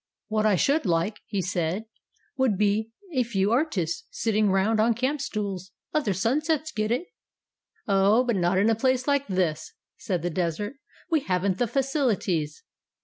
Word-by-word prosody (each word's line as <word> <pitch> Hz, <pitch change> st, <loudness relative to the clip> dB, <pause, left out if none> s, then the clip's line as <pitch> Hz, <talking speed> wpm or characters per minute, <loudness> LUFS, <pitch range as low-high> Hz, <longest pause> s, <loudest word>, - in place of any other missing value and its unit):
"What 215 Hz, 0 st, +2 dB
I 205 Hz, -, +4 dB
should 280 Hz, -, +2 dB
like," 175 Hz, +5 st, 0 dB
he 200 Hz, -4 st, -2 dB
said, 180 Hz, +2 st, -1 dB, 0.5 s
"would 260 Hz, -7 st, +2 dB
be 210 Hz, +2 st, +1 dB, 0.2 s
a 260 Hz, -, +2 dB
few 205 Hz, -4 st, 0 dB
artists, 225 Hz, -, 0 dB
sitting 215 Hz, -2 st, +1 dB
round 195 Hz, +3 st, +2 dB
on 225 Hz, +1 st, +3 dB
camp 265 Hz, +5 st, -1 dB
stools. 200 Hz, -6 st, -4 dB, 0.2 s
Other 295 Hz, -9 st, +1 dB
sunsets 300 Hz, -, 0 dB
get 215 Hz, -4 st, -1 dB
it." 250 Hz, +10 st, 0 dB, 0.8 s
"Oh, 200 Hz, +4 st, +4 dB
but 240 Hz, -3 st, 0 dB
not 180 Hz, 0 st, +2 dB
in 205 Hz, +4 st, +4 dB
a -, -, +3 dB
place 260 Hz, +2 st, +1 dB
like 280 Hz, -1 st, +1 dB
this," 185 Hz, -, -1 dB, 0.3 s
said 180 Hz, -7 st, -2 dB
the 175 Hz, -, -1 dB
Desert. 185 Hz, -, -2 dB, 0.3 s
"We 320 Hz, -, +4 dB
haven't 190 Hz, -5 st, 0 dB
the 245 Hz, -, +2 dB
facilities." 220 Hz, -, 0 dB
215 Hz, 160 wpm, -26 LUFS, 190-255 Hz, 0.8 s, I